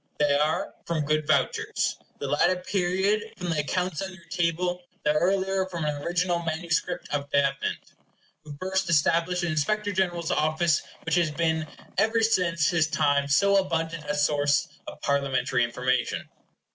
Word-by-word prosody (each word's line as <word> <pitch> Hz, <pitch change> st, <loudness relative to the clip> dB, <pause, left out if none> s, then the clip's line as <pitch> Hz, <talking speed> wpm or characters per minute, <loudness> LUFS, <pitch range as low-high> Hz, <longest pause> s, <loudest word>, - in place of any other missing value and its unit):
They 145 Hz, -1 st, +3 dB
are 150 Hz, +2 st, 0 dB
from 160 Hz, -3 st, -1 dB
good 155 Hz, 0 st, 0 dB
vouchers; 140 Hz, -4 st, +1 dB, 0.2 s
the -, -, -5 dB
latter 175 Hz, +5 st, +2 dB
period 190 Hz, +4 st, 0 dB
from 180 Hz, -2 st, -3 dB
the 160 Hz, -, 0 dB
accounts 180 Hz, +3 st, -1 dB
on 190 Hz, -1 st, -4 dB
your 185 Hz, -2 st, -15 dB
table, 180 Hz, +1 st, 0 dB, 0.2 s
the 150 Hz, -, +3 dB
earlier 190 Hz, +3 st, +1 dB
from 170 Hz, -4 st, -4 dB
an 145 Hz, -1 st, -2 dB
original 175 Hz, +2 st, 0 dB
manuscript 170 Hz, +1 st, -2 dB
of 145 Hz, -1 st, -2 dB
Davenant, 140 Hz, -1 st, -1 dB, 0.5 s
who 150 Hz, -2 st, -9 dB
first 190 Hz, -1 st, -1 dB
established 170 Hz, +3 st, +2 dB
the -, -, 0 dB
Inspector 205 Hz, +7 st, 0 dB
General's 175 Hz, -4 st, -1 dB
office, 155 Hz, +1 st, +2 dB, 0.2 s
which 165 Hz, -, -2 dB
has 170 Hz, -2 st, +3 dB
been 160 Hz, 0 st, 0 dB, 0.3 s
ever 220 Hz, +2 st, +2 dB
since 170 Hz, -7 st, +2 dB
his 165 Hz, -3 st, +2 dB
time 145 Hz, -3 st, +2 dB
so 200 Hz, +8 st, +4 dB
abundant 165 Hz, -4 st, -1 dB
a 150 Hz, -, 0 dB
source 145 Hz, -1 st, +2 dB, 0.2 s
of -, -, -8 dB
Parliamentary 135 Hz, -3 st, +1 dB
information. 125 Hz, +1 st, -1 dB
165 Hz, 155 wpm, -26 LUFS, 150-180 Hz, 0.5 s, so